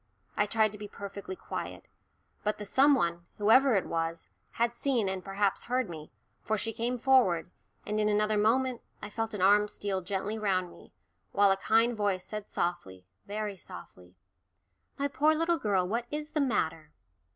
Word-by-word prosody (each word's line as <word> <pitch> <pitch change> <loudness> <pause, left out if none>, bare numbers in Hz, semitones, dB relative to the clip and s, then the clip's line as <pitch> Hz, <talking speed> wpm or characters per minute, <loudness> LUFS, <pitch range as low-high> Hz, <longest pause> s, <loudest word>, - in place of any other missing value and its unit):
I 210 - +2
tried 220 0 +2
to 210 - -10
be 210 - -6
perfectly 200 -1 -7
quiet. - - -6 0.6
But 210 0 0
the 210 - -6
some 275 +7 +5
one, 170 -6 -1
whoever 230 +4 +5
it 195 - +1
was, 165 0 -2 0.3
had 235 0 +1
seen 245 -6 0
and 190 -1 -3
perhaps 195 0 -1
heard 250 -5 -1
me, 155 -2 -9 0.3
for 220 - -1
she 225 +2 -2
came 240 +2 -1
forward, 230 -10 +3 0.3
and 210 +1 -1
in 210 0 +2
another 210 +1 +2
moment 240 +4 +2 0.2
I 205 - -8
felt 225 0 -3
an 190 - -1
arm 205 +2 +5
steal 200 -2 -3
gently 195 +4 -3
round 185 -4 0
me, - - -16 0.4
while 200 -1 +5
a - - +4
kind 225 +4 +3
voice 200 -3 0
said 210 -1 -6
softly, 95 - -3 0.2
very 210 0 -3
softly, 90 - -11 0.8
"My 280 - 0
poor 305 +2 +3
little 330 +1 +1
girl, 190 -4 +1
what 235 +4 -2
is 300 +1 -4
the 300 - 0
matter?" 160 - -1
210 Hz, 175 wpm, -30 LUFS, 190-235 Hz, 0.8 s, some